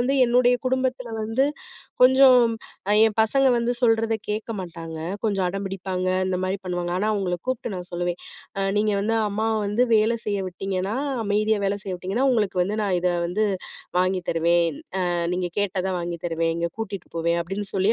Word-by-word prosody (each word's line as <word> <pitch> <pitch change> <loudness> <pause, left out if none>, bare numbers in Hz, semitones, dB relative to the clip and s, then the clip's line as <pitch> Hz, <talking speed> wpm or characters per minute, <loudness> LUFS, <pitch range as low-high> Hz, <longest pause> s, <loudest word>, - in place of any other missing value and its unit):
வந்து 250 +3 +1
என்னுடைய 245 +1 +4
குடும்பத்தில 255 -1 -1
வந்து 225 +5 +1 0.6
கொஞ்சம் 260 -1 +7 0.6
என் 215 - -2
பசங்க 270 +5 +2
வந்து 235 +1 +1
சொல்றத 225 -1 +3
கேட்க 215 +2 -3
மாட்டாங்க. 165 -2 -7 0.3
கொஞ்சம் 200 -4 +1
அடம்பிடிப்பாங்க, 190 -1 -3 0.2
இந்த 185 -1 0
மாரி 185 +1 -1
பண்ணுவாங்க. 175 -1 -2
ஆனா, 210 - 0
அவுங்கள 190 -4 -1
கூப்ட்டு 255 -3 -2
நான் 180 -1 -6
சொல்லுவேன், 175 0 -2 0.4
அ - - 0
"நீங்க 210 0 +2
வந்து 220 +3 0
அம்மாவ 220 +2 0
வந்து 210 +4 +1
வேல 220 +2 +3
செய்ய 205 -1 -1
விட்டீங்கன்னா, 190 +2 -3 0.3
அமைதியா 215 +1 +1
வேல 200 +1 +1
செய்ய 190 - -5
விட்டீங்கன்னா, 195 +8 -1
உங்களுக்கு 210 -6 +1
வந்து 200 +4 -2
நான் 195 -3 +1
இத 180 - +2 0.2
வந்து 195 +5 0 0.5
வாங்கி 185 0 +1
தருவேன். 170 -1 +2 0.2
அ - - +1 0.3
நீங்க 180 -1 -2
கேட்டத 190 -2 -1
வாங்கித் 170 -1 -5
தருவேன். 165 -1 0
இங்க 170 0 -1
கூட்டிட்டு 200 -5 -5
போவேன்." 170 +1 +1
அப்பிடின்னு 195 +4 -5
சொல்லி 195 +3 +3
195 Hz, 165 wpm, -24 LUFS, 180-225 Hz, 0.6 s, கொஞ்சம்